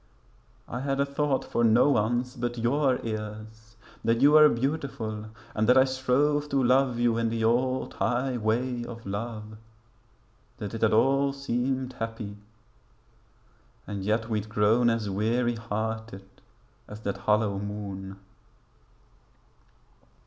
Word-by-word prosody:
I 125 - -5
had 135 +1 -2
a 140 - +3
thought 140 -1 -1
for 120 - -1
no 115 +5 +5
one's 120 +2 0
but 120 0 -3
your 130 +3 +2
ears; 110 +1 -7 0.3
That 115 +1 +2
you 140 +3 +6
were 150 0 +8
beautiful 125 -5 -3 0.3
and 110 +2 0
that 125 - +6
I 130 - +8
strove 135 +3 +1
To 135 -1 +1
love 125 0 +3
you 120 -1 +2
in 115 0 +1
the 115 0 -2
old 130 +3 +1
high 125 +6 0
way 120 +2 -1
of 115 -1 -9
love; 110 +1 -5 1.0
That 105 0 -6
it 115 - -5
had 110 - +4
all 135 +5 +3
seemed 130 -1 -2
happy, 115 -2 -5 1.5
and 100 -2 -5
yet 110 +3 0
we'd 110 -2 -2
grown 110 +3 +3
As 115 -2 -1
weary 115 +4 0
hearted 110 -2 -4 0.6
as 105 +1 -10
that 100 -2 -3
hollow 105 -2 +1
moon. 100 -1 -6
115 Hz, 135 wpm, -27 LUFS, 110-130 Hz, 1.5 s, were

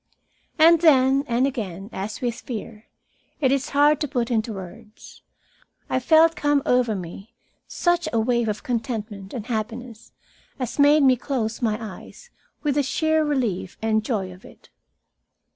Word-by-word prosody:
And 330 +1 +6
then 270 -4 +5
and 240 +2 +2
again, 200 -8 -4
as 200 +3 -5
with 240 -2 -1
fear, 225 -2 -8 0.5
it 265 -4 +2
is 275 -1 0
hard 290 +1 +3
to 295 - 0
put 245 -3 -2
into 225 0 0
words 210 +3 -11 0.7
I - - +2
felt 320 +5 +5
come 290 -1 +1
over 245 -3 +2
me 195 +5 -9 0.3
such 345 -2 0
a 230 - +1
wave 235 0 +1
of 210 0 -4
contentment 220 -5 -4
and 230 -5 -6
happiness 230 0 -5 0.5
as 255 +1 -5
made 290 +1 +6
me 260 -2 +5
close 235 -4 -3
my 220 -3 0
eyes 230 - -10 0.3
with 295 -2 +1
the 290 - +2
sheer 315 +3 +1
relief 240 -11 -2
and 220 -1 0
joy 200 -6 -2
of 185 - -17
it. - - -17
240 Hz, 155 wpm, -23 LUFS, 215-285 Hz, 0.7 s, And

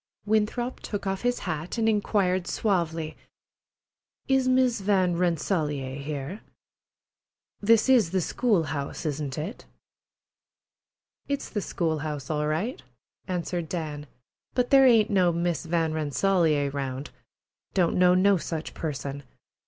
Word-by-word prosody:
Winthrop 220 +4 0
took 205 -1 -5
off 195 0 -2
his 245 0 +1
hat 160 +3 -3
and 225 -1 +1
inquired 200 -4 +1
suavely: 165 -6 -1 1.1
"Is 265 -1 +3
Miss 255 -4 +3
Van 190 -3 +2
Rensselaer 155 -6 0
here? 145 +7 -5 1.2
This 220 +2 +4
is 245 -9 +5
the 190 +2 +1
school 205 0 +1
house, 145 +1 -4
isn't 145 -3 -3
it?" 165 +10 -5 1.6
"It's 280 0 -3
the 210 - -1
school 160 -4 -1
house 150 -1 -4
all 150 0 0
right," 180 - -2 0.5
answered 175 -2 -3
Dan, 150 -4 -4 0.5
"but 250 -1 +1
there 270 -1 +7
ain't 225 -3 +5
no 185 -3 +4
Miss 170 -1 -1
Van 165 -1 +1
Rensselaer 155 -1 +1
round. 135 0 -4 0.6
Don't 180 -4 +2
know 180 0 +5
no 195 +1 +4
such 165 -1 -5
person. 140 -2 -4
175 Hz, 125 wpm, -26 LUFS, 155-210 Hz, 1.6 s, there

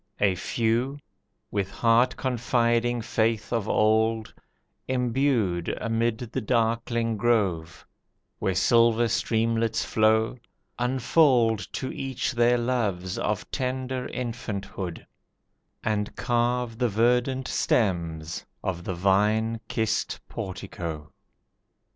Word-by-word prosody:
A 100 -2 +3
few, 115 +8 0 0.5
with 100 -2 -1
heart 120 +4 +3
confiding 120 -1 +1
faith 110 -1 0
of 115 -4 -1
old, 110 +1 +2 0.5
imbued 125 -8 +1
Amid 115 0 0
the - - -2
darkling 115 0 0
grove, 100 -8 0 0.5
where 95 - 0
silver 115 +4 +4
streamlets 115 +1 0
flow, 110 +2 +2 0.4
Unfold 125 -2 +3
to 130 - -3
each 135 -2 -2
their 120 0 +3
loves 105 -7 -1
of 105 -2 -2
tender 130 -1 -2
infanthood, 100 -7 -5 0.8
And 105 -1 -1
carve 120 -1 0
the 125 -2 +2
verdant 125 +4 +1
stems 85 -6 0 0.2
of 90 -2 -3
the 95 - -3
vine 105 +5 +2
kissed 110 -1 -1
portico. 80 -5 -6
115 Hz, 95 wpm, -26 LUFS, 105-120 Hz, 0.8 s, silver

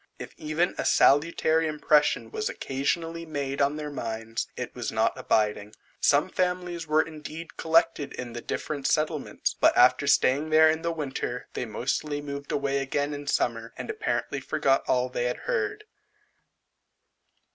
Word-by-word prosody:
If - - -9
even 155 +4 -1
a - - 0
salutary 160 +2 +3
impression 150 -1 +2
was 435 +1 -2
occasionally 165 - -2
made 140 -3 -3
on 140 +1 +2
their 150 -1 -5
minds, 115 -3 -4
it - - -5
was - - -4
not - - +1
abiding. 105 -1 0 0.2
Some 145 +3 +3
families 180 -2 -2
were 155 +1 +4
indeed 160 +1 -9
collected 165 -2 +2
in 120 -2 -6
the 120 - -6
different 140 +2 -3
settlements, 155 -2 0
but - - +3
after - - +5
staying 145 +5 +3
there 155 0 +6
the 170 +1 -3
winter, 135 -5 -4
they - - -3
mostly 135 +6 -2
moved 140 -1 -6
away 140 -1 0
again 145 +2 -1
in 145 0 -7
summer, 115 -3 -1
and - - -4
apparently 435 0 -2
forgot 135 0 +1
all 125 0 +2
they 125 -1 -2
had 125 - -1
heard. 425 -3 -1
150 Hz, 150 wpm, -27 LUFS, 135-165 Hz, 0.2 s, there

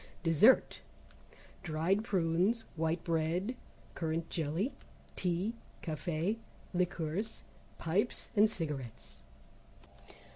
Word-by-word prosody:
Dessert. 165 - +5 0.8
Dried 175 +4 +1
prunes 190 +3 +2
White 160 +1 0
bread, 170 +7 0 0.4
Currant 165 0 -2
Jelly, 165 - -1 0.4
Tea 185 +5 0 0.3
Café, 170 +5 -1 0.4
Liqueurs, 180 +3 -1 0.3
Pipes 190 +8 0
and 210 +1 +6
Cigarettes. 150 - -5
170 Hz, 75 wpm, -34 LUFS, 160-200 Hz, 0.8 s, and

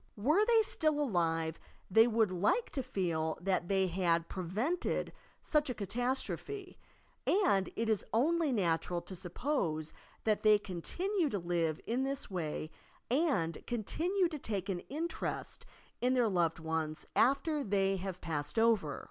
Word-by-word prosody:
Were 300 - +3
they 455 0 +5
still 310 -7 +1
alive 165 - 0 0.3
they 225 +4 +7
would 220 -4 +2
like 210 - +1
to 270 - -1
feel 165 -8 -1
that 185 -1 0
they 190 0 +2
had 170 -2 +1
prevented 215 - -1 0.3
such 300 -2 +1
a 250 - -2
catastrophe, 255 - -2 0.5
and 360 - +3
it 230 - -1
is 220 -3 +2
only 310 +6 +2
natural 175 -5 +1
to 190 - -8
suppose 175 - -2 0.3
that 215 -2 +2
they 215 -1 +6
continue 320 - -2
to 205 - -1
live 170 -3 0
in 240 +3 0
this 275 -4 -3
way 155 -3 -3 0.4
and 255 - +1
continue 340 - 0
to 305 -3 -5
take 200 -5 -3
an 185 -2 -1
interest 325 +4 -4 0.3
in 250 +1 +3
their 245 -2 +3
loved 170 -4 +1
ones 160 -1 -3
after 280 +4 +3
they 195 -2 +1
have 185 -1 -5
passed 150 -1 -3
over. 220 -11 +3
205 Hz, 145 wpm, -33 LUFS, 175-275 Hz, 0.5 s, they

